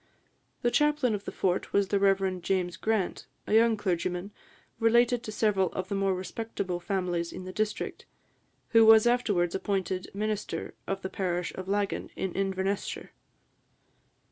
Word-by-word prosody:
The 240 - +3
chaplain 295 -5 +2
of 205 -1 -4
the - - -4
fort 185 -1 -1
was 200 -1 +2
the 200 - +2
Rev. 195 -2 +2
James 180 -1 0
Grant, 215 -5 -1 0.2
a - - -2
young 225 0 +5
clergyman, 180 0 -2 0.5
related 235 +1 +4
to 220 - -6
several 200 -4 +1
of 185 0 -4
the - - -2
more 195 -1 +1
respectable 190 -1 -4
families 175 -3 -2
in - - -7
the 185 - -7
district, 215 +1 -3 0.6
who 225 -1 +6
was 220 0 +8
afterwards 205 -8 +2
appointed 190 -2 -2
minister 215 0 -3
of 195 0 -3
the 190 - -3
parish 180 -2 -2
of 185 0 -7
Laggan, 200 0 -1
in 190 - -3
Inverness 195 0 -1
shire. - - -7
195 Hz, 155 wpm, -28 LUFS, 185-215 Hz, 0.6 s, was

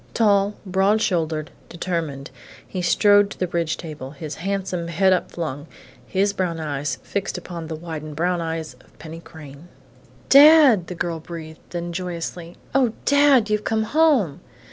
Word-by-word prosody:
Tall, 205 -2 +3
broad 195 +3 +2
shouldered, 160 -6 -1 0.2
determined, 165 -6 -4 0.4
he 185 - -4
strode 205 +3 +4
to - - -10
the 185 - 0
bridge 170 -2 -2
table, 150 -5 -8
his 155 +1 -6
handsome 185 -3 -2
head 190 +3 +3
upflung, 160 -5 -3 0.4
his 200 +1 +1
brown 175 -4 -2
eyes 145 -3 -3
fixed 195 -1 -3
upon 170 -2 -7
the 160 - -5
widened 155 -2 -7
brown 175 +2 0
eyes 160 -3 -4
of - - -26
Penny 160 +1 -9
Crain. 155 -2 -13 0.6
"Dad!" 280 - +7
the 180 - -6
girl 165 -1 -3
breathed; 160 -1 -9
then, 175 0 -5
joyously: 175 -1 -5 0.2
"Oh, 255 -4 +2
Dad! 285 -6 +4
You've 210 0 0
come 220 0 0
home!" 260 - +2
175 Hz, 150 wpm, -22 LUFS, 160-200 Hz, 0.6 s, Dad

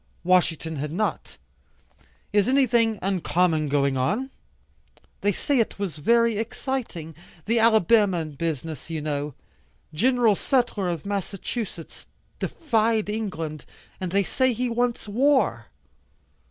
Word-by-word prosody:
Washington 165 -3 +1
had 150 +2 -3
not. 210 +6 -2 1.0
"Is 205 -1 +3
anything 240 -4 +3
uncommon 175 -4 +1
going 140 -1 +1
on?" 210 - -1 0.9
"They 205 - +2
say 275 +7 0
it 225 - 0
was 190 -7 -4
very 230 +7 +3
exciting. 225 - -4 0.3
The 230 +2 +2
Alabama 215 -5 +4
business 155 +1 -4
you 160 -1 -3
know. 145 -2 -3 0.6
Gen. 240 +5 +3
Sutler, 230 -4 0
of 170 -1 -4
Massachusetts, 200 -2 -5 0.3
defied 225 -7 0
England, 165 -9 -4 0.3
and 185 -2 -3
they 200 +1 +3
say 260 +6 +1
he 245 +2 -1
wants 240 -1 -1
war." 265 +6 +2
200 Hz, 115 wpm, -25 LUFS, 160-230 Hz, 1.0 s, Alabama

